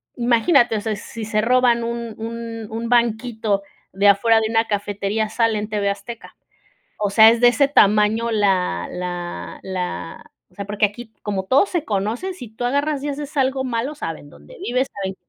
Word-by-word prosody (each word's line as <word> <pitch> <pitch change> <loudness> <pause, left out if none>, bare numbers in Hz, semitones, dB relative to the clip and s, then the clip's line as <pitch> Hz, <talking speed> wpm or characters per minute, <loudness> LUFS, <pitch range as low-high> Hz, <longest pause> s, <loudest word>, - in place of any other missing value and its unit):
imagínate, 240 0 +3
o 205 - -3
sea, 220 -1 -2
si 220 +2 -8
se 215 0 0
roban 240 0 +3
un 235 -1 -4
un 230 0 -6
un 230 +1 -4
banquito 225 -3 +1 0.3
de 200 +2 +2
afuera 225 +3 +5
de 220 0 -1
una 225 0 +1
cafetería 205 +1 -1
sale 225 0 +1
en 210 - -4
TV 205 -2 0
Azteca, 200 +4 -7 0.6
o 205 -1 0
sea, 220 +2 +8
es 230 0 +1
de 245 - +7
ese 280 +3 +3
tamaño 215 -1 +3
la 185 - +1
la 175 - -5
la 180 - -5 0.2
o - - -27
sea, 200 - -6
porque 205 +1 0
aquí, 220 +2 -11
como 195 -2 -2
todos 275 - +4
se 345 -4 -1
conocen, 220 - -2
si 250 -10 -9
tú 220 +3 -7
agarras 285 +3 0
y 290 - -3
haces 290 +1 -6
algo 265 -1 +1
malo, 250 +3 -2
saben 165 - -6
dónde 75 +1 -15
vives, 255 +2 0
saben 195 -1 -4
225 Hz, 185 wpm, -21 LUFS, 200-240 Hz, 0.6 s, sea